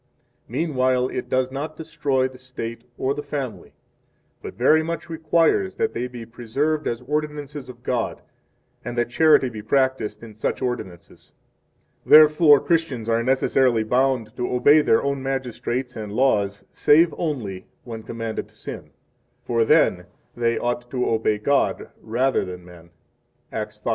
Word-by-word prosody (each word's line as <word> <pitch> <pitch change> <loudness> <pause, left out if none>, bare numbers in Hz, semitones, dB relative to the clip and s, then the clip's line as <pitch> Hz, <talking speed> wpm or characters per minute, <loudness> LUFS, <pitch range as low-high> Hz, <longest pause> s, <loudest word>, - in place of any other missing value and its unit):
Meanwhile, 130 -2 0
it 125 - -5
does 130 0 +1
not 150 +3 -5
destroy 145 -5 -1
the 130 -1 -14
State 120 -2 -7
or 135 +1 0
the 145 - -5
family, 140 -5 -6 0.7
but - - -8
very 155 +6 +4
much 165 +1 -5
requires 165 +3 +1
that 225 - -1
they 125 +2 -2
be 120 -2 -9
preserved 135 +7 -2
as 115 +1 -2
ordinances 150 -1 -4
of 120 -1 -12
God, 120 -2 -2 0.6
and 120 0 -6
that 120 0 0
charity 155 -2 +5
be 110 -3 -7
practiced 130 -2 0
in 110 -2 -10
such 110 - -2
6 - - -17
ordinances. 105 -9 -6 0.7
Therefore, 150 -1 +7
Christians 145 -9 -1
are 115 0 +2
necessarily 130 -2 +2
bound 125 -1 0
to 125 - -2
obey 145 +5 +5
their 115 - +3
own 140 -1 -1
magistrates 130 -1 -3
7 105 -2 -6
and - - -8
laws 100 -6 +1
save 160 +2 +4
only 110 - -4 0.2
when 115 -2 -7
commanded 115 0 -5
to - - -26
sin; - - -8 0.6
for 115 -1 +2
then 90 -4 +3 0.3
they 115 -1 0
ought 120 0 -2
to 125 -1 -1
obey 110 -1 +1
God 140 +7 0
rather 125 +4 0
than 90 -1 -8
men. 85 -1 -15 0.6
Acts 105 -1 -5
5:29. - - -35
125 Hz, 155 wpm, -23 LUFS, 115-145 Hz, 0.7 s, Therefore